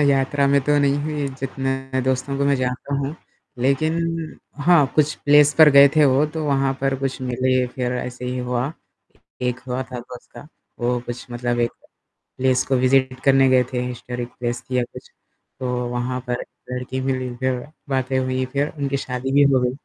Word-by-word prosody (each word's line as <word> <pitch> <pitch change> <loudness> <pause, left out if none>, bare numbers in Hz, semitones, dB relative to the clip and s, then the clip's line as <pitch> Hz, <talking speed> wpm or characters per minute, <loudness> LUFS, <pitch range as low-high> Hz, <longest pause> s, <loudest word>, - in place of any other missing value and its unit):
यात्रा 140 0 +2
में 140 0 +4
तो 145 0 +3
नहीं 140 0 +2
है 150 -2 -2
जितने 135 0 -3
दोस्तों 130 +1 -1
को 140 - +1
मैं 140 0 +3
जानता 130 +2 -2
हूँ 140 +2 -2 0.5
लेकिन 155 +5 +2 0.7
हाँ, 170 -4 +5
कुछ 150 0 +3
प्लेस 145 0 +6
पर 155 -2 +9
गए 140 0 +8
थे 150 - +6
वो, 135 +2 +4
तो 155 +1 -4
वहाँ 135 -2 +1
पर 135 0 +1
कुछ 135 -1 -2
मिले 130 0 +1
फिर 125 0 -3
ऐसे 125 0 -5
ही 125 0 -3
हुआ। 125 +3 -2 0.7
एक 125 0 -1
हुआ 125 +1 -2
था 125 - -4
दोस्त 125 0 -12
का, 120 +4 -11 0.3
वो 120 +1 0
कुछ 120 0 -6
मतलब 120 0 -1
एक 120 - +1 0.7
प्लेस 130 0 +2
को 135 - +2
विजिट 130 0 +2
करने 135 -1 +5
गए 130 -1 +5
थे 125 - 0
हिस्टोरिक 125 0 -5
प्लेस 120 0 -2
थी 125 - 0
या 125 - +2
कुछ - - -11 0.5
तो 130 -2 -2 0.2
वहाँ 125 +1 -2
पर 125 0 -2 0.3
लड़की 125 +1 -4
मिली 130 -1 -1
जो 130 -1 +1 0.3
बातें 130 -1 0
हुई 130 0 -1
फिर 140 +1 +1
उनकी 140 -1 -1
शादी 130 0 -4
भी 145 +1 +6
हो 130 - +4
गई 125 0 +1
130 Hz, 185 wpm, -22 LUFS, 125-140 Hz, 0.7 s, पर